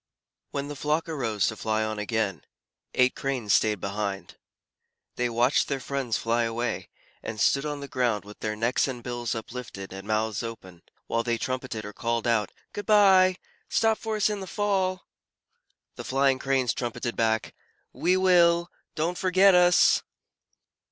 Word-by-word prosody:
When 140 0 -4
the 145 - -6
flock 150 +4 -1
arose 115 - -1
to 110 - -1
fly 110 0 -1
on 110 -1 -3
again, 105 -6 -1 0.5
eight 125 0 +3
Cranes 130 -7 -1
stayed 105 -2 +3
behind. 100 0 -4 0.8
They 125 0 0
watched 120 +4 +2
their 140 -1 -2
friends 130 -3 -2
fly 115 +1 0
away, 115 -6 -2 0.3
and 110 -1 -6
stood 140 +6 +2
on 145 -1 -4
the 140 - -6
ground 120 -6 0
with 105 0 -12
their 105 -1 -2
necks 115 +6 +1
and 125 -3 -6
bills 120 -2 -3
uplifted 110 -4 -7
and 95 +1 -9
mouths 110 -1 0
open, 95 -7 -8 0.2
while 115 - 0
they 115 0 -1
trumpeted 130 -3 -4
or 105 - -7
called 115 +1 -2
out, 115 -4 +1 0.2
"Good 205 -2 -6
bye! 190 -3 +6 0.3
Stop 225 -1 +2
for 220 -2 -3
us 210 - +2
in 210 -1 -2
the 190 - -7
fall!" 190 -3 -1 0.9
The - - -6
flying 135 0 +2
Cranes 135 -3 +1
trumpeted 120 -1 -4
back, 110 -1 0 0.4
"We 180 +2 +2
will! 170 -2 +4 0.2
Don't 165 +3 -1
forget 190 +1 +5
us!" 180 0 +5
125 Hz, 160 wpm, -26 LUFS, 110-165 Hz, 0.9 s, bye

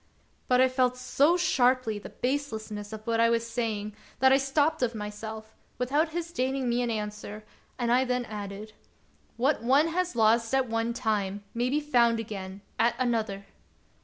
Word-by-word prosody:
But 250 0 +4
I 260 - +6
felt 255 -1 +1
so 285 +6 +3
sharply 255 - +2
the - - -9
baselessness 220 -6 -3
of 215 0 -8
what 230 -1 0
I 230 0 +5
was 230 0 +1
saying 220 -3 -3 0.2
that 265 +1 +5
I - - +6
stopped 285 +3 +1
of 240 -2 0
myself, 220 +1 -7 0.2
without 285 +6 +1
his 335 +1 -4
deigning 265 -3 -1
me 240 +1 +1
an 240 - -1
answer, 210 -1 -5 0.3
and 240 -2 0
I 250 +2 +4
then 250 -1 -1
added: 210 0 -7 0.3
" - - -36
What 270 +3 +1
one 275 +7 +3
has 360 -2 -1
lost 230 +2 +3
at 265 -1 +2
one 230 +1 -1
time 205 -4 -1
may 240 +2 0
be 290 +3 +1
found 240 -6 +3
again 195 -3 -6 0.2
at 235 +1 +3
another! 220 -6 -1
235 Hz, 175 wpm, -28 LUFS, 215-260 Hz, 0.3 s, I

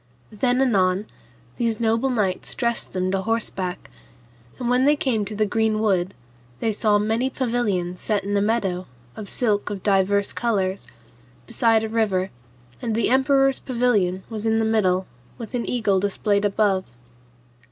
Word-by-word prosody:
Then 245 +4 +1
anon 195 -5 +2 0.5
these 230 -1 0
noble 230 +3 +1
knights 205 -7 -1
dressed 235 -1 -1
them 185 0 -1
to 195 0 0
horseback, 190 -4 -3 0.7
and 245 - -3
when 250 +2 +3
they 295 +1 +5
came 235 -7 0
to 210 +1 -6
the 215 +1 +2
green 220 +1 +1
wood, 195 -3 +1 0.4
they 225 - 0
saw 210 0 +2
many 225 +5 0
pavilions 215 -9 -1
set 210 -3 0
in 200 +1 -2
a 200 - +2
meadow, 195 -4 0 0.3
of 205 -3 -8
silk 210 -5 0
of 200 -3 -6
divers 200 0 +2
colours, 195 - -1 0.6
beside 225 - +2
a - - -1
river, 200 -4 0 0.5
and 230 -3 -2
the 230 - +1
emperor's 270 0 +3
pavilion 215 -8 0
was 220 -1 -4
in 225 0 +2
the 225 - +1
middle 190 -4 +2 0.3
with 230 0 -8
an 240 -2 -2
eagle 215 -6 +1
displayed 205 +1 0
above. 200 -2 +2
215 Hz, 155 wpm, -23 LUFS, 195-235 Hz, 0.7 s, they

